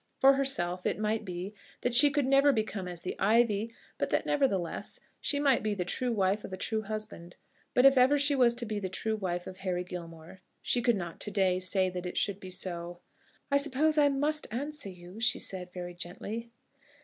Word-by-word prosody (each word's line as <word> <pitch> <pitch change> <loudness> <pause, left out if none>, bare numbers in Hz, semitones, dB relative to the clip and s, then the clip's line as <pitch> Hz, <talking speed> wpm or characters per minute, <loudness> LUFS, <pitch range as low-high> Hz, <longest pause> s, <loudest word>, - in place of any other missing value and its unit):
For 270 +1 +7
herself, 180 -10 0
it - - -1
might 215 +1 -1
be, 185 +1 -6 0.3
that 245 - -1
she 280 +4 +8
could 285 -1 0
never 275 +2 +5
become 215 -6 -2
as 175 -1 -6
the 180 - -4
ivy; 220 +1 +2 0.3
but - - -1
that, - - 0
nevertheless, 200 - -1 0.2
she 285 - 0
might 280 -3 +3
be 215 -1 -1
the 180 -2 -2
true 250 +7 -2
wife 200 -1 +1
of - - -8
a 185 - -5
true 220 +3 -2
husband. 215 -5 -7 0.4
But 250 - +5
if 275 -1 +7
ever 265 +3 +5
she 285 +1 +3
was 245 -3 +4
to 240 0 -3
be 215 -2 -3
the 190 -2 -4
true 220 +4 -2
wife 180 -4 -3
of 185 - -8
Harry 185 -2 -2
Gilmore, 170 0 -9 0.2
she 245 - +1
could 240 -1 +3
not 175 -3 -6
to - - 0
day 190 -3 +1
say 185 0 +2
that 180 0 -5
it 180 - -6
should 200 -1 +1
be 185 - -9
so. 175 -1 -4 0.5
"I 280 - +5
suppose 295 +2 +2
I 290 -1 +5
must 295 +2 0
answer 285 +1 -4
you," 180 +2 -11
she 235 0 +2
said, 180 -2 -2
very 175 -1 -7
gently. 205 +7 -6
210 Hz, 210 wpm, -30 LUFS, 180-255 Hz, 0.5 s, she